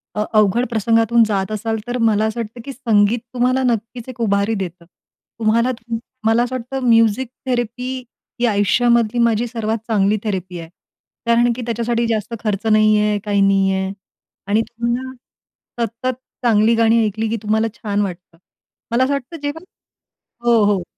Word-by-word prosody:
अ, 210 Hz, -, 0 dB
अवघड 215 Hz, +4 st, +3 dB
प्रसंगातून 230 Hz, +1 st, +3 dB
जात 195 Hz, -1 st, -1 dB
असाल, 220 Hz, +1 st, -2 dB
तर 245 Hz, -, -2 dB
मला 220 Hz, -2 st, +2 dB
असं 220 Hz, +2 st, -3 dB
वाटतं 230 Hz, +1 st, -6 dB
की 275 Hz, -, -5 dB
संगीत 225 Hz, -3 st, +2 dB
तुम्हाला 255 Hz, +1 st, +1 dB
नक्कीच 235 Hz, +1 st, -2 dB
एक 250 Hz, -1 st, -10 dB
उभारी 200 Hz, 0 st, +1 dB
देतं. 175 Hz, -3 st, -6 dB, 0.5 s
तुम्हाला 230 Hz, +3 st, +2 dB
त 230 Hz, -1 st, -8 dB, 0.3 s
मला 225 Hz, +2 st, +4 dB
असं 255 Hz, +1 st, -3 dB
वाटतं 255 Hz, +1 st, -3 dB
म्युझिक 230 Hz, +2 st, +4 dB, 0.2 s
थेरपी 245 Hz, -1 st, -2 dB, 0.5 s
ही 245 Hz, -, +2 dB
आयुष्यामधली 235 Hz, +2 st, +2 dB
माझी 235 Hz, 0 st, +2 dB
सर्वात 225 Hz, -1 st, -2 dB
चांगली 210 Hz, -1 st, +2 dB
थेरपी 185 Hz, -4 st, -3 dB
आहे. 165 Hz, 0 st, -9 dB, 0.6 s
कारण 235 Hz, +1 st, +3 dB
की 250 Hz, -, -5 dB
त्याच्यासाठी 235 Hz, 0 st, -1 dB
जास्त 225 Hz, 0 st, -2 dB
खर्च 210 Hz, 0 st, -2 dB
नाहीये, 215 Hz, -1 st, +4 dB
काही 205 Hz, -1 st, +1 dB
नाही 195 Hz, -1 st, +3 dB
आहे. 190 Hz, 0 st, -1 dB, 0.6 s
आणि 210 Hz, +2 st, +2 dB
तुम्ही 235 Hz, +1 st, -3 dB
ना, 260 Hz, 0 st, -7 dB, 0.7 s
सतत 235 Hz, +4 st, -3 dB, 0.3 s
चांगली 225 Hz, 0 st, +4 dB
गाणी 225 Hz, 0 st, +3 dB
ऐकली 220 Hz, +2 st, -2 dB
की 230 Hz, -, -1 dB
तुम्हाला 220 Hz, +1 st, +1 dB
छान 205 Hz, -4 st, -2 dB
वाटतं. 180 Hz, -3 st, -6 dB, 0.5 s
मला 240 Hz, +2 st, +3 dB
असं 275 Hz, +2 st, +1 dB
वाटतं 280 Hz, +4 st, -4 dB
जेव्हा 290 Hz, +4 st, -4 dB, 0.9 s
हो, 230 Hz, -3 st, +5 dB
हो. 200 Hz, -3 st, +1 dB
225 Hz, 160 wpm, -19 LUFS, 210-240 Hz, 0.9 s, हो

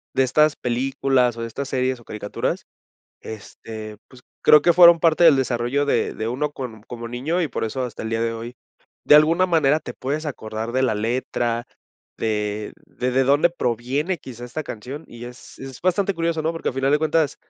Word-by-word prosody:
de 130 Hz, -, +4 dB
estas 150 Hz, +3 st, +3 dB
películas, 125 Hz, 0 st, 0 dB
o 115 Hz, -, -7 dB
de 115 Hz, -, -3 dB
estas 135 Hz, +4 st, -5 dB
series, 130 Hz, -1 st, -1 dB
o 120 Hz, -, -18 dB
caricaturas, 105 Hz, -1 st, -3 dB, 0.6 s
este, 110 Hz, 0 st, -9 dB
pues, 125 Hz, -1 st, -17 dB, 0.2 s
creo 150 Hz, -1 st, +7 dB
que 175 Hz, -, +5 dB
fueron 170 Hz, -1 st, +8 dB
parte 165 Hz, +1 st, +3 dB
del 155 Hz, -4 st, +8 dB
desarrollo 130 Hz, +2 st, 0 dB
de 145 Hz, -, 0 dB
de 110 Hz, -, -3 dB
uno 140 Hz, +5 st, -2 dB
con 115 Hz, -6 st, -7 dB
como 120 Hz, -1 st, -7 dB
niño 150 Hz, +9 st, -1 dB
y 155 Hz, -, -1 dB
por -, -, -3 dB
eso 130 Hz, +4 st, -3 dB
hasta 120 Hz, -, -7 dB
el 110 Hz, -, -4 dB
día 115 Hz, 0 st, 0 dB
de 115 Hz, 0 st, 0 dB
hoy, 115 Hz, +2 st, -7 dB, 0.5 s
de -, -, +6 dB
alguna 165 Hz, +5 st, +5 dB
manera, 155 Hz, -4 st, +3 dB
te -, -, -7 dB
puedes 145 Hz, +4 st, -3 dB
acordar 110 Hz, -4 st, -5 dB
de 130 Hz, +1 st, +1 dB
la 115 Hz, -4 st, +2 dB
letra, 120 Hz, +1 st, -2 dB, 0.5 s
de 105 Hz, -1 st, -2 dB
de 125 Hz, 0 st, -3 dB
de 130 Hz, +1 st, +2 dB
dónde 145 Hz, +5 st, +4 dB
proviene 140 Hz, -, -1 dB
quizá 120 Hz, -3 st, -10 dB
esta 155 Hz, +6 st, -5 dB
canción 135 Hz, +8 st, -8 dB
y 120 Hz, +1 st, -10 dB
es 120 Hz, 0 st, -13 dB
es 135 Hz, -2 st, -9 dB
bastante 190 Hz, +2 st, +1 dB
curioso, 165 Hz, -1 st, -1 dB
¿no?, 160 Hz, -, 0 dB
porque 165 Hz, -, -3 dB
al -, -, -12 dB
final 135 Hz, +1 st, +1 dB
de 150 Hz, -, +4 dB
cuentas 155 Hz, -1 st, +1 dB
130 Hz, 200 wpm, -22 LUFS, 115-150 Hz, 0.6 s, fueron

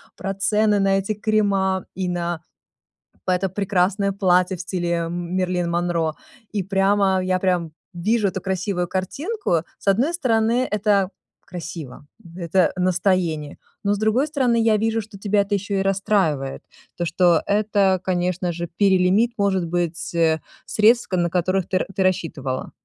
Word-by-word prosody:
про 195 Hz, +1 st, -4 dB
цены 210 Hz, +1 st, +2 dB
на 195 Hz, 0 st, +3 dB
эти 200 Hz, +3 st, -2 dB
крема 200 Hz, -3 st, +1 dB
и 185 Hz, 0 st, -2 dB
на 175 Hz, -2 st, -2 dB, 0.8 s
п 185 Hz, -, +2 dB
это 190 Hz, +1 st, -1 dB
прекрасное 195 Hz, +1 st, +1 dB
платье 185 Hz, -1 st, +2 dB
в -, -, -5 dB
стиле, 180 Hz, -1 st, -3 dB, 0.2 s
эм, 175 Hz, +1 st, -4 dB
Мэрилин 180 Hz, -2 st, 0 dB
Монро. 170 Hz, -2 st, 0 dB, 0.4 s
И 205 Hz, -3 st, -1 dB
прямо, 195 Hz, 0 st, +2 dB
я 185 Hz, 0 st, +1 dB
прям 180 Hz, -3 st, 0 dB, 0.2 s
вижу 205 Hz, +4 st, +1 dB
эту 190 Hz, 0 st, -5 dB
красивую 190 Hz, -1 st, -2 dB
картинку. 275 Hz, -, -2 dB, 0.2 s
С -, -, -18 dB
одной 235 Hz, -, +3 dB
стороны, 235 Hz, -4 st, +1 dB
это 205 Hz, -2 st, +2 dB, 0.4 s
красиво, 165 Hz, -6 st, -8 dB, 0.3 s
это 180 Hz, 0 st, +1 dB
настроение, 180 Hz, -4 st, 0 dB, 0.2 s
но 200 Hz, 0 st, +1 dB
с -, -, -1 dB
другой 220 Hz, +7 st, +2 dB
стороны, 255 Hz, -6 st, +1 dB
я 225 Hz, -1 st, +4 dB
вижу, 225 Hz, +1 st, 0 dB
что 210 Hz, -1 st, -12 dB
тебя 205 Hz, +1 st, +1 dB
это 200 Hz, +1 st, -1 dB
ещё 200 Hz, +1 st, -3 dB
и 195 Hz, -, +1 dB
расстраивает. 190 Hz, -8 st, 0 dB, 0.4 s
То, 175 Hz, -, -1 dB
что 170 Hz, 0 st, +3 dB
это, 200 Hz, -3 st, +2 dB
конечно 180 Hz, -1 st, -1 dB
же, 170 Hz, 0 st, -4 dB
перелимит, 195 Hz, +3 st, +3 dB
может 195 Hz, -3 st, +1 dB
быть, 170 Hz, 0 st, -2 dB
э, 160 Hz, -1 st, +2 dB, 0.2 s
средств 225 Hz, +3 st, +3 dB
к 185 Hz, -, -2 dB
на 175 Hz, -1 st, +1 dB
которых 185 Hz, +1 st, 0 dB
ты 185 Hz, -, +1 dB
р -, -, -1 dB
ты 195 Hz, -, +1 dB
рассчитывала. 160 Hz, -8 st, -2 dB
190 Hz, 160 wpm, -22 LUFS, 175-205 Hz, 0.8 s, я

